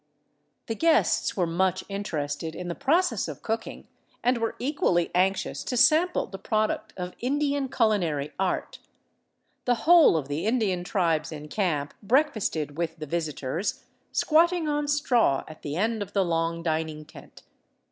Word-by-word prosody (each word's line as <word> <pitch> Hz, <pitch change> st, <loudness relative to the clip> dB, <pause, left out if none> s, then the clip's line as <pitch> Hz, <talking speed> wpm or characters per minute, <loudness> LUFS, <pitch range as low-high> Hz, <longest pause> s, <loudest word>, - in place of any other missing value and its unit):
The 225 Hz, -, -2 dB
guests 325 Hz, -1 st, +2 dB
were 180 Hz, -, +2 dB
much 185 Hz, +2 st, 0 dB
interested 160 Hz, -6 st, -4 dB
in 180 Hz, -1 st, -5 dB
the -, -, -1 dB
process 275 Hz, -, +1 dB
of 150 Hz, -4 st, -8 dB
cooking 225 Hz, +1 st, -4 dB, 0.4 s
and 245 Hz, 0 st, +2 dB
were 225 Hz, 0 st, -2 dB
equally 245 Hz, -, 0 dB
anxious 190 Hz, +2 st, 0 dB
to 250 Hz, -, -2 dB
sample 325 Hz, +8 st, +4 dB
the 195 Hz, -, -9 dB
product 215 Hz, 0 st, -1 dB
of 180 Hz, 0 st, -5 dB
Indian 280 Hz, +1 st, 0 dB
culinary 175 Hz, -, +1 dB
art. 190 Hz, -1 st, -2 dB, 0.9 s
The 245 Hz, -2 st, 0 dB
whole 335 Hz, -, +7 dB
of 145 Hz, -4 st, -3 dB
the 145 Hz, +7 st, -2 dB
Indian 210 Hz, -7 st, +1 dB
tribes 165 Hz, -4 st, 0 dB
in 150 Hz, -1 st, -8 dB
camp 155 Hz, -8 st, -1 dB
breakfasted 205 Hz, -, 0 dB
with 165 Hz, -1 st, -2 dB
the 155 Hz, -, -6 dB
visitors, 155 Hz, +2 st, -3 dB, 0.3 s
squatting 335 Hz, +1 st, +3 dB
on 295 Hz, 0 st, 0 dB
straw 245 Hz, -, +2 dB
at 155 Hz, -, -12 dB
the 145 Hz, 0 st, -4 dB
end 220 Hz, +4 st, 0 dB
of 200 Hz, 0 st, -6 dB
the 195 Hz, -2 st, +2 dB
long 165 Hz, 0 st, -1 dB
dining 155 Hz, -1 st, -2 dB
tent. -, -, -15 dB
190 Hz, 150 wpm, -26 LUFS, 160-245 Hz, 0.9 s, whole